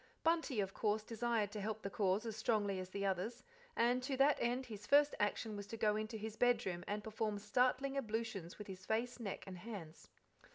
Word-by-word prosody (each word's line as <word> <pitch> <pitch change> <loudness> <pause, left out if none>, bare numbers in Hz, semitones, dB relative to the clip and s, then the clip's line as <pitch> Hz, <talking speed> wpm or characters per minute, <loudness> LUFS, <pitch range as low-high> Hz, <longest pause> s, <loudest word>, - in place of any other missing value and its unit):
Bunty, 325 -7 +2
of 195 0 -3
course, 210 0 +1
desired 225 -2 0
to 210 - -4
help 215 +1 -3
the 200 - -2
cause 195 +2 +1
as 225 -2 -3
strongly 210 -3 +1
as 185 0 -5
the 200 +1 -2
others, 195 +5 -1 0.3
and 245 +2 +3
to 265 +1 -2
that 275 +2 +6
end 245 +2 0
his 210 -4 -8
first 290 +1 +6
action 210 +1 0
was 205 0 -6
to 225 - -6
go 210 -1 +3
into 215 +1 -3
his 220 0 -5
bedroom 225 -8 +2
and 205 0 -2
perform 215 -1 -1
startling 255 +6 +2
ablutions 220 -8 -2
with 210 - -7
his 185 -1 -8
face, 235 +5 -1
neck, 205 -5 -4
and 185 -2 -7
hands. 180 -7 -8
215 Hz, 205 wpm, -38 LUFS, 200-240 Hz, 0.3 s, that